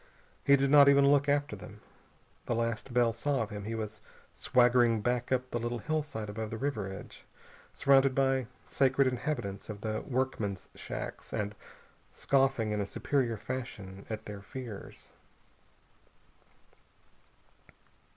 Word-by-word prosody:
He 140 - +6
did 140 0 +1
not 145 -1 +8
even 140 0 +6
look 145 0 +3
after 145 0 +1
them. - - -11 0.7
The 120 - 0
last 115 +2 -2
Bell 120 -1 +3
saw 135 +2 0
of 110 - -8
him 105 -1 -6
he 115 +1 -3
was 110 -1 -5 0.3
swaggering 120 -2 +3
back 120 +2 -1
up 130 0 0
the 120 - -1
little 120 +1 -2
hillside 150 -4 -3
above 110 +1 -4
the 115 - -5
river 125 -7 -2
edge, 95 - -10 0.4
surrounded 135 -1 +4
by 135 -2 +2 0.2
scared 135 0 +2
inhabitants 125 -6 -2
of 105 -1 -6
the 110 0 -2
workmen's 120 -8 -2
shacks, - - -6
and 105 0 -2 0.6
scoffing 135 -5 +1
in 105 0 0
a - - -1
superior 120 -1 0
fashion 105 -6 -6
at 110 -1 -5
their 105 -1 -7
fears. 115 -1 -9
120 Hz, 140 wpm, -31 LUFS, 110-135 Hz, 0.7 s, not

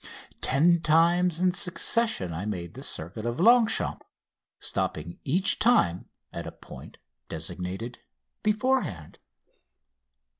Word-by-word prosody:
Ten 170 +6 +4
times 170 +2 +3
in 185 0 +3
succession 180 - +1
I 90 +6 -4
made 85 -5 -5
the - - -9
circuit 90 +7 -5
of 120 +3 -3
Longchamps, 230 +3 +3 0.6
stopping 80 +3 -3
each 180 +8 +1
time 95 - +2 0.2
at - - -6
a - - -6
point - - -13 0.3
designed 95 +7 -6 0.4
beforehand. 215 - -1
160 Hz, 105 wpm, -27 LUFS, -, 0.6 s, Ten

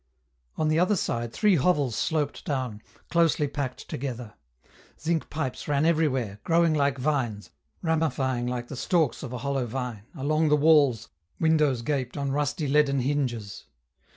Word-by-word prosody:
On 155 - 0
the 155 +1 +2
other 185 +4 +3
side 120 -9 -2
three 205 - +3
hovels 145 -6 +2
sloped 150 0 -1
down, 130 -7 -3 0.3
closely 165 -3 +3
packed 140 -2 -5
together; 125 -4 -5 0.7
zinc 165 0 -1
pipes 150 -4 -4
ran 145 +1 +2
everywhere, 135 -11 +1
growing 165 -1 +3
like 140 -2 +1
vines, 125 -7 -1 0.3
ramifying 135 -7 0
like 120 -1 -3
the 140 - -7
stalks 155 -1 +1
of 125 - -6
a 125 - -4
hollow 135 -3 0
vine 120 -3 -5
along 155 +2 +1
the 150 - +5
walls, 145 - +4 0.3
windows 150 -6 +2
gaped 130 0 -2
on 140 -1 -1
rusty 145 +2 -1
leaden 140 -1 +3
hinges. 120 -7 -2
140 Hz, 150 wpm, -26 LUFS, 125-155 Hz, 0.7 s, the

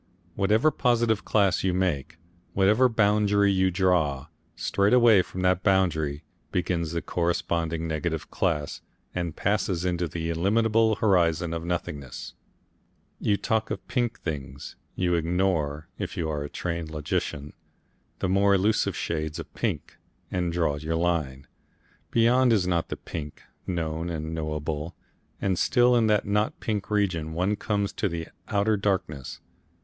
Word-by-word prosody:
Whatever 105 - +3
positive 120 -5 +1
class 100 -4 +2
you 95 -2 +1
make, 80 -4 -1 0.4
whatever 105 +7 +4
boundary 105 -2 +3
you 95 -1 +3
draw, 85 -7 +1 0.3
straight 100 +2 +1
away 120 -5 +7
from 90 +1 -6
that 90 -1 +3
boundary 80 -7 +1 0.3
begins 85 -3 -1
the 85 - -2
corresponding 85 -1 -1
negative 80 0 -3
class 75 -5 -1 0.3
and 85 -3 -3
passes 95 -3 0
into 90 -1 0
the 80 +1 -3
illimitable 110 +5 +2
horizon 85 -5 +2
of 85 0 -3
nothingness. 75 -6 -4 0.9
You 100 -1 +1
talk 110 +1 0
of - - -5
pink 120 -4 -1
things, 70 -4 -6 0.2
you 90 -1 +1
ignore, 85 -3 0
if - - -4
you 80 - -1
are 75 -1 -2
a 75 - -6
trained 85 -2 -4
logician, 75 -1 -3 0.6
the - - -1
more 100 +2 +4
elusive 105 +3 +1
shades 80 -1 -3
of 80 - -8
pink, - - -3 0.3
and 90 -2 0
draw 85 -4 0
your 80 +2 -2
line. 80 -6 -1 0.6
Beyond 120 +2 +4
is 105 -4 +3
the 90 - -1
not 85 -2 -1
pink, 75 -2 -6 0.2
known 80 -2 -2
and 80 -1 -4
knowable, 75 0 -3 0.4
and 95 -3 0
still 125 0 +4
in 115 -2 +3
the 105 -1 +3
not 105 +1 0
pink 105 -3 -3
region 90 -7 0
one 90 +5 +1
comes 100 -1 -1
to 105 - -1
the 80 -1 -5 0.2
Outer 105 +1 +2
Darkness. 95 -9 -2
90 Hz, 145 wpm, -26 LUFS, 80-100 Hz, 0.9 s, away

